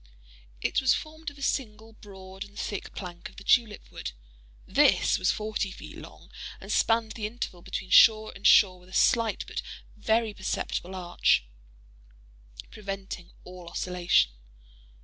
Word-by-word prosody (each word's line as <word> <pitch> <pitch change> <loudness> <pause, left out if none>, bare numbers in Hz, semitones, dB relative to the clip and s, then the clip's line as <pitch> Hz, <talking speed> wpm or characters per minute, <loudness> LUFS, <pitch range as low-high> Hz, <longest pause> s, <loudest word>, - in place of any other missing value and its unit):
It - - +1
was 260 -1 +4
formed 315 0 -6
of 285 - -16
a 280 - -8
single, 220 -5 -2
broad 190 -2 -10
and 205 0 -16
thick 205 - -5
plank 175 -2 -7
of - - -20
the 200 - -11
tulip 220 -1 +2
wood. - - -6 0.5
This - - +3
was - - +1
forty 215 -2 -1
feet 190 - -10
long, - - -13 0.3
and - - -8
spanned 225 -1 +2
the 215 -2 -3
interval 215 -6 -6
between 185 +2 -6
shore 220 -1 +6
and 195 - +1
shore 185 -3 +6
with 180 +1 -19
a - - -15
slight 230 0 +2
but - - -4 0.3
very 220 -1 +1
perceptible 190 -1 -3
arch, 175 - +2 1.3
preventing 195 -4 -6
all 180 -1 -11
oscillation. 175 - +2
205 Hz, 150 wpm, -28 LUFS, 185-225 Hz, 1.3 s, shore